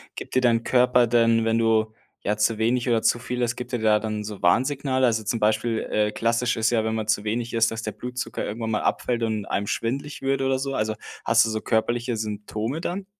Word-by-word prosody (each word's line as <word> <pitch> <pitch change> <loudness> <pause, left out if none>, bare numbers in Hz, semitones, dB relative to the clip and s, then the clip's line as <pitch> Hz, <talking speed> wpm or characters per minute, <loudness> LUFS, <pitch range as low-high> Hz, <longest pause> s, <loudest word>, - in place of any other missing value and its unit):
Gibt - - -8
dir 130 - +4
dein 115 -2 +3
Körper 125 -1 +4
denn, 115 -1 +3
wenn 115 0 +2
du, 110 -1 +2 0.3
ja, 105 - 0
zu 105 +1 +1
wenig 120 +3 +1
oder 115 -2 +2
zu 120 +1 +3
viel 125 +1 -4
isst 120 0 0
gibt 125 - -7
dir 120 - -1
da 105 -1 +3
dann 110 -1 -3
so 105 -1 -7
Warnsignale? 130 +7 +2
Also 110 -2 +1
zum 115 +2 -2
Beispiel, 110 +2 +1
äh, 105 0 +1
klassisch 115 +2 0
ist 110 +1 +2
ja, 110 -2 +2
wenn 110 0 -1
man 110 -1 -3
zu 105 -1 +1
wenig 115 +2 -2
ist, 115 0 +3
dass 115 +1 -5
der 110 - -3
Blutzucker 125 +1 -5
irgendwann 110 +1 -4
mal 105 - 0
abfällt 120 -1 -1
und 110 -3 -1
einem 100 0 -2
schwindlig 135 +6 -3
wird 135 0 +1
oder 135 0 +1
so. 135 +1 -3
Also, 110 -1 -1 0.3
hast - - +4
du - - -2
so 110 0 -2
körperliche 120 +1 0
Symptome 110 +6 -4
dann? 190 +2 -4
115 Hz, 230 wpm, -24 LUFS, 110-125 Hz, 0.3 s, dir